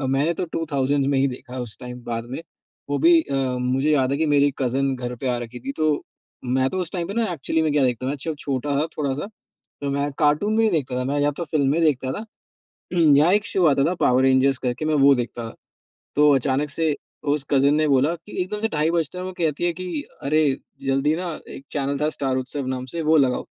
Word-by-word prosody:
अ, 135 Hz, -, -1 dB
मैंने 140 Hz, +6 st, +1 dB, 0.2 s
2000s 140 Hz, -3 st, 0 dB
में 140 Hz, -, +2 dB
ही 135 Hz, -, +3 dB
देखा 125 Hz, 0 st, -8 dB
उस 115 Hz, -5 st, -6 dB
टाइम 125 Hz, 0 st, -8 dB
बाद 115 Hz, -1 st, -4 dB
में, 135 Hz, -, -4 dB, 0.5 s
वो 145 Hz, -, +1 dB
भी 165 Hz, +3 st, +6 dB
अ, 140 Hz, -, -5 dB, 0.3 s
मुझे 130 Hz, +4 st, +1 dB
याद 135 Hz, -2 st, +2 dB
है 140 Hz, -, 0 dB
कि 160 Hz, -, +1 dB
मेरी 145 Hz, -1 st, +4 dB
कज़िन 135 Hz, +1 st, 0 dB
घर 125 Hz, 0 st, -4 dB
पे 135 Hz, -, -1 dB
आ -, -, -2 dB
रखी 120 Hz, +1 st, -7 dB
थी 135 Hz, +3 st, -5 dB
तो 155 Hz, -1 st, +2 dB, 0.5 s
मैं 130 Hz, +1 st, +1 dB
तो 185 Hz, -, -3 dB
उस 175 Hz, -3 st, -4 dB
टाइम 175 Hz, -3 st, -2 dB
पे 200 Hz, -, -4 dB
ना 230 Hz, 0 st, +1 dB
एक्चुअली 160 Hz, +1 st, -1 dB
में 155 Hz, -2 st, +1 dB
क्या 145 Hz, -2 st, +3 dB
देखता 125 Hz, 0 st, -1 dB
था, -, -, 0 dB
मैं 145 Hz, -, -2 dB
जब 160 Hz, -2 st, -3 dB
छोटा 140 Hz, +1 st, -1 dB
था 155 Hz, -, +1 dB
थोड़ा-सा, 145 Hz, +2 st, -1 dB, 0.6 s
तो 140 Hz, -, -1 dB
मैं 140 Hz, +1 st, -1 dB
कार्टून 155 Hz, +8 st, +2 dB
भी 225 Hz, -, +4 dB
नहीं 220 Hz, -, +3 dB
देखता 135 Hz, -6 st, -1 dB
था, 125 Hz, -, -1 dB
मैं 140 Hz, +3 st, -1 dB
या 145 Hz, 0 st, +3 dB
तो 170 Hz, -, -2 dB
फ़िल्में 150 Hz, -1 st, +1 dB
देखता 135 Hz, -4 st, +1 dB
था, 215 Hz, -, -5 dB, 0.7 s
उहुँ, 160 Hz, -5 st, +5 dB
या 155 Hz, +4 st, +5 dB
एक 205 Hz, +1 st, +3 dB
शो 185 Hz, -3 st, +2 dB
आता 140 Hz, -1 st, +3 dB
था 170 Hz, +4 st, +1 dB
पावर 125 Hz, +1 st, +4 dB
रेंजर्स 130 Hz, 0 st, +4 dB
करके, 125 Hz, +4 st, -2 dB
मैं 155 Hz, 0 st, +1 dB
वो 140 Hz, -1 st, +6 dB
देखता 120 Hz, -1 st, -4 dB
था। -, -, -14 dB, 0.6 s
तो 150 Hz, 0 st, +6 dB
अचानक 135 Hz, +2 st, 0 dB
से 155 Hz, +1 st, 0 dB, 0.3 s
उस 145 Hz, -1 st, +1 dB
कज़िन 140 Hz, 0 st, +4 dB
ने 155 Hz, 0 st, +2 dB
बोला 140 Hz, +4 st, +3 dB
कि 185 Hz, +3 st, -7 dB
एकदम 210 Hz, +3 st, -4 dB
से 225 Hz, -, +1 dB
ढाई 155 Hz, +1 st, +1 dB
बजते 170 Hz, 0 st, -1 dB
हैं -, -, -4 dB
और -, -, -4 dB
वो -, -, -12 dB
कहती 160 Hz, -1 st, 0 dB
है 175 Hz, -, +2 dB
कि, 175 Hz, -4 st, -4 dB, 0.2 s
"अरे! 145 Hz, -1 st, +2 dB, 0.3 s
जल्दी 135 Hz, +3 st, +2 dB
ना 180 Hz, +2 st, -4 dB, 0.3 s
एक 135 Hz, -, -10 dB
चैनल 140 Hz, -1 st, -1 dB
था 150 Hz, -, +2 dB
स्टार 135 Hz, -4 st, -2 dB
उत्सव 130 Hz, +1 st, -3 dB
नाम 130 Hz, -1 st, -3 dB
से, 170 Hz, -, -2 dB
वो 160 Hz, +1 st, +4 dB
लगाओ।" 130 Hz, -3 st, +1 dB
140 Hz, 245 wpm, -23 LUFS, 130-160 Hz, 0.7 s, भी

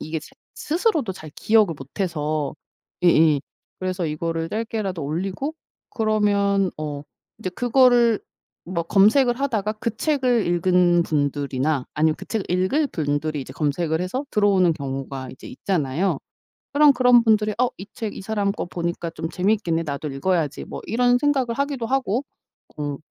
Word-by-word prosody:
이게 160 Hz, +1 st, -3 dB
스 -, -, -13 dB, 0.2 s
스스로도 320 Hz, -, 0 dB
잘 155 Hz, -4 st, -10 dB
기억을 215 Hz, -6 st, +3 dB
못해서 150 Hz, -1 st, -2 dB, 0.5 s
예예 160 Hz, -4 st, +5 dB, 0.4 s
그래서 185 Hz, -2 st, -2 dB
이거를 165 Hz, +1 st, -2 dB
짧게라도 215 Hz, -6 st, -3 dB
올리고 190 Hz, -, -3 dB, 0.4 s
그러면 205 Hz, -4 st, +2 dB
어 150 Hz, -2 st, -4 dB, 0.4 s
이제 205 Hz, -4 st, -4 dB
그거를 245 Hz, +1 st, +4 dB, 0.4 s
뭐 170 Hz, -1 st, -2 dB
검색을 235 Hz, +8 st, +4 dB
하다가 215 Hz, -7 st, 0 dB
그 220 Hz, +1 st, -4 dB
책을 255 Hz, -7 st, +1 dB
읽은 175 Hz, 0 st, +3 dB
분들이나 145 Hz, -2 st, -1 dB
아니면 155 Hz, +1 st, +2 dB
그 -, -, -10 dB
책을 215 Hz, -6 st, -3 dB
읽을 185 Hz, -, +2 dB
분들이 150 Hz, -, -2 dB
이제 135 Hz, -, -8 dB
검색을 160 Hz, +2 st, 0 dB
해서 255 Hz, +10 st, -3 dB
들어오는 195 Hz, -5 st, +3 dB
경우가 135 Hz, -2 st, -5 dB
이제 130 Hz, -, -12 dB
있잖아요. 170 Hz, 0 st, -1 dB, 0.5 s
그럼 295 Hz, 0 st, +6 dB
그런 245 Hz, -2 st, +5 dB
분들이 215 Hz, -1 st, +3 dB
'어 250 Hz, -, +4 dB
이 190 Hz, -, -8 dB
책 220 Hz, -3 st, -4 dB
이 -, -, -7 dB
사람 205 Hz, -1 st, 0 dB
거 200 Hz, -, -3 dB
보니까 170 Hz, -1 st, -3 dB
좀 160 Hz, -, -5 dB
재밌겠네. 180 Hz, -4 st, +1 dB
나도 145 Hz, +1 st, -4 dB
읽어야지.' 150 Hz, +2 st, -1 dB
뭐 -, -, -7 dB
이런 245 Hz, +3 st, +3 dB
생각을 275 Hz, -3 st, +1 dB
하기도 280 Hz, -3 st, -2 dB
하고 260 Hz, -1 st, 0 dB, 0.6 s
음 145 Hz, -1 st, -2 dB
185 Hz, 325 characters per minute, -23 LUFS, 155-230 Hz, 0.6 s, 그럼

